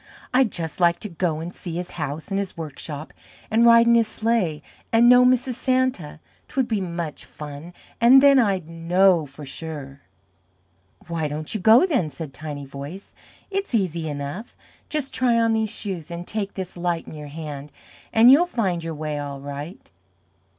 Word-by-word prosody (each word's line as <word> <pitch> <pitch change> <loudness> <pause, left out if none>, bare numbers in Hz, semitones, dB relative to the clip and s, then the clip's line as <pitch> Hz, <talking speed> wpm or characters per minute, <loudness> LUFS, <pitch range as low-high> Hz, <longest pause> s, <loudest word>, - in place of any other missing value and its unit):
I'd 255 -4 +3
just 165 -1 -4
like 170 -1 +4
to 210 - -5
go 165 -2 -1
and 170 +2 -6
see 170 -2 -6
his 180 +1 -4
house 145 +4 -5
and 195 0 -1
his 195 -3 -5
workshop, 155 -1 -7 0.4
and 230 +2 +5
ride 230 0 +7
in 235 - +5
his 230 -2 +4
sleigh, 215 -10 -1 0.3
and 230 +1 +5
know 250 0 +8
Mrs. 255 0 +3
Santa 255 - 0 0.3
'twould 260 -1 -1
be 215 -3 -1 0.2
such 160 -4 -4
fun, 150 +3 -9 0.3
and 250 +3 +8
then 275 -1 +6
I'd 195 -8 +1
KNOW 170 0 +2
for 140 +2 -11
sure." 145 -2 -7 1.1
"Why 165 -2 -2
don't 150 +1 -4
you 215 - -2
go, 225 - +7
then?" 260 - 0
said 145 0 -8
Tiny 150 -2 -6
Voice. 140 +8 -9 0.4
"It's 395 -8 -2
easy 170 -6 -1
enough. 145 +10 -6 0.3
Just 300 -4 -3
try 240 -2 +2
on 230 0 +2
these 220 -1 0
Shoes, 190 -7 -4
and 170 0 -6
take 205 -1 -3
this 190 -2 -6
Light 175 -1 -2
in - - -9
your 150 -1 -8
hand, 145 -1 -7 0.4
and 230 +3 +7
you'll 330 +6 +6
find 190 - -1
your 165 -1 -4
way 150 -1 -4
all 140 -1 -5
right." 145 +5 -8
175 Hz, 180 wpm, -23 LUFS, 155-230 Hz, 1.1 s, know